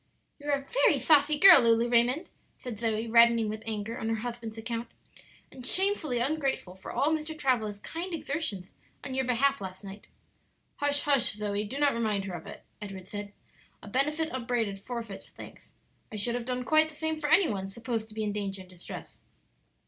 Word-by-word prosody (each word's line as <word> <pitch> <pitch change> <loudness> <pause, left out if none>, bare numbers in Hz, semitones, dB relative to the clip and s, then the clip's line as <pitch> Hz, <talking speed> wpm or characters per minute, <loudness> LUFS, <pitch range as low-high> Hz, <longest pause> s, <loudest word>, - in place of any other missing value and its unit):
"You 290 0 -7
are 280 -1 +1
a - - -25
very - - +3
saucy 300 -1 +4
girl, 385 -4 +9
Lulu 230 0 +3
Raymond," 245 +7 +2 0.3
said 235 -5 -7
Zoe, 225 -1 -1
reddening 230 -1 +5
with 215 +1 -5
anger 220 +1 -4
on 225 - -2
her 225 - +1
husband's 230 -2 -6
account, 230 +1 -4 0.6
"and 255 - -11
shamefully 365 -4 +2
ungrateful 270 -7 -1
for 190 - -9
all 285 - +1
Mr. 315 0 -3
Travilla's 225 -7 0
kind 335 - -6
exertions 285 - -3 0.3
on 265 - -5
your 265 0 0
behalf 270 +2 +2
last 190 0 -7
night." 200 +1 -10 0.7
"Hush, 285 0 +1
hush, 275 -6 +3
Zoe; 210 0 -2
do 255 +7 -6
not 285 -1 +3
remind 215 -4 -1
her 190 - -5
of 170 -2 -7
it," - - -10 0.2
Edward 195 -3 -7
said. 205 +1 -7 0.5
"'A - - -9
benefit 300 +7 0
upbraided 235 -5 -2
forfeits 230 -2 -7
thanks.' - - -13 0.4
I - - -7
should 215 +3 0
have 240 -1 -3
done 250 0 -2
quite 310 +2 +4
the 310 - -13
same 315 0 -2
for 295 -1 -2
any 330 +3 +6
one 195 -2 -3
supposed 230 +1 -4
to 215 - -14
be 220 - -2
in 205 -1 -1
danger 200 -2 -4
and 185 - -14
distress." 175 -1 -10
235 Hz, 195 wpm, -29 LUFS, 210-285 Hz, 0.7 s, girl